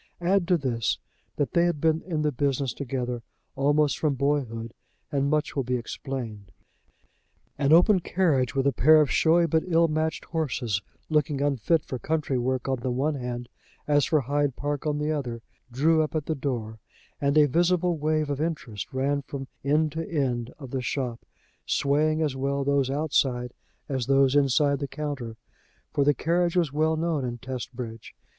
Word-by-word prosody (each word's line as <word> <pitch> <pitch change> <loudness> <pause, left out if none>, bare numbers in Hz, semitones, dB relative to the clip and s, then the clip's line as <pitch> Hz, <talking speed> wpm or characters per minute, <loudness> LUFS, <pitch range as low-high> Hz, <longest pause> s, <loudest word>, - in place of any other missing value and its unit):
Add 180 0 +2
to 180 -2 +4
this, 120 -6 -1 0.4
that 145 - -1
they 170 0 +4
had 175 -4 0
been 160 +1 +2
in 160 -4 -2
the 150 - +2
business 135 -1 0
together 125 -3 -3 0.3
almost 145 +1 +2
from 150 -3 +1
boyhood, 125 -5 -1 0.4
and 140 -1 +1
much 150 0 0
will 140 - +1
be 125 +1 -1
explained. 115 -5 -6 1.1
An 140 0 +2
open 180 +4 +6
carriage, 155 -8 +1
with 135 0 +1
a 140 - +4
pair 155 +6 +6
of 150 -2 +2
showy 170 +1 +4
but 160 0 +2
ill 165 -1 +4
matched 155 0 -1
horses, 125 - -1 0.3
looking 150 -2 +1
unfit 145 +3 +1
for 130 - -5
country 150 -2 -1
work 130 +2 -1
on 130 -1 0
the 125 - -2
one 135 +5 0
hand, 125 -3 -5 0.4
as 145 -1 +4
for 155 -2 +2
Hyde 145 +1 0
Park 145 +1 -3
on 150 -1 0
the 150 +1 -1
other, 120 -6 -3 0.3
drew 155 +6 +3
up 155 +1 -2
at 155 -2 -1
the 160 - -1
door; 120 -6 -4 0.4
and 140 +1 +2
a 150 - +7
visible 175 +4 +2
wave 155 -1 0
of 140 +1 -2
interest 135 - -4
ran 140 +2 0
from 135 -1 -7 0.2
end 150 +2 +2
to 160 +2 -4
end 125 -6 -1
of 135 -4 -10
the 130 - -2
shop, 125 -2 -3 0.4
swaying 155 +3 +2
as 145 -4 -1
well 140 +1 -1
those 140 -1 +1
outside 135 -4 0 0.3
as 130 -4 -2
those 135 0 +4
inside 140 0 +3
the 140 - -3
counter, 135 -6 -5 0.6
for 140 - +2
the 145 0 +3
carriage 175 +1 +1
was 165 -6 +1
well 155 +1 +2
known 160 -3 0
in 120 -1 -3
Testbridge. 120 -2 -7
140 Hz, 180 wpm, -26 LUFS, 130-155 Hz, 1.1 s, a